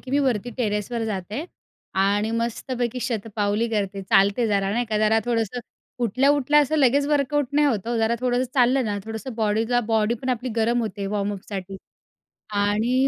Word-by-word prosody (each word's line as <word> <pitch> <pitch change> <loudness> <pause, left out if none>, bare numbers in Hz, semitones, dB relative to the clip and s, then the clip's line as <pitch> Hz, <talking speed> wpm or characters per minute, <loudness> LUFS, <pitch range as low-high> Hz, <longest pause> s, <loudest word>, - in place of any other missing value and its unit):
की 255 - -10
मी 280 - +2
वरती 245 -4 0
टेरेसवर 225 0 -1
जाते 210 - -4 0.6
आणि 205 +2 +1
मस्तपैकी 240 +1 -2
शतपावली 220 -1 -1
करते. 200 -3 -2
चालते 200 +4 +3
जरा 200 -2 +1
नाही 240 +3 0
का. 215 -1 -1
जरा 215 +1 +3
थोडंसं 235 0 -1 0.4
उठल्या-उठल्या 280 +5 +3
असं 300 +2 +1
लगेच 280 +1 +3
वर्कआउट 290 -1 +1
नाही 295 +1 +4
होतं 230 -4 -1
हो. 235 - 0
जरा 225 +1 +2
थोडंसं 250 0 0
चाललं 255 0 +3
ना, 205 -1 -2
थोडंसं 225 +3 -6
बॉडीला 225 +2 +1
बॉडी 220 +1 +2
पण 260 - -4
आपली 250 0 -1
गरम 235 +2 +2
होते 205 -2 -4
वॉर्मअप 205 -1 -2
साठी 195 -1 -5 0.9
आणि 235 +6 +2
230 Hz, 165 wpm, -24 LUFS, 210-255 Hz, 0.9 s, नाही